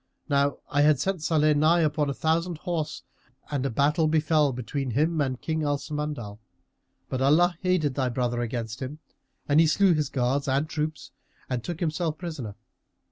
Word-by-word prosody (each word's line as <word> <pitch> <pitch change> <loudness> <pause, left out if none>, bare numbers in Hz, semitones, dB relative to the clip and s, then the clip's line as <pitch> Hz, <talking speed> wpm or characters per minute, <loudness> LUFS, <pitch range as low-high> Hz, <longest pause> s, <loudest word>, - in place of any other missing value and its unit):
Now 140 -2 +2
I 145 +1 +3
had 150 -2 +4
sent 190 +3 -1
Salih 155 -1 +3
nigh 155 +4 +4
upon 150 -2 +1
a - - -1
thousand 165 +3 0
horse 165 -2 -3 0.5
and 140 -3 -1
a 135 - 0
battle 150 +7 +2
befel 155 -2 +3
between 130 +2 -4
him 155 +6 +1
and 130 -3 -1
King 160 -1 -2
Al 145 -1 +1
Samandal; 145 -9 -5 0.7
but 130 - -3
Allah 170 +6 +4
aided 180 -6 +1
thy 130 -1 0
brother 120 0 -1
against 115 -1 -4
him, 135 +3 -5 0.5
and 145 +1 +4
he 165 - +6
slew 185 +4 +4
his 150 -4 0
guards 135 +2 0
and 140 +3 +1
troops 155 -1 -4 0.4
and 125 -2 -1
took 170 +3 -5
himself 160 -1 -1
prisoner. 150 - -6
150 Hz, 175 wpm, -26 LUFS, 135-160 Hz, 0.7 s, he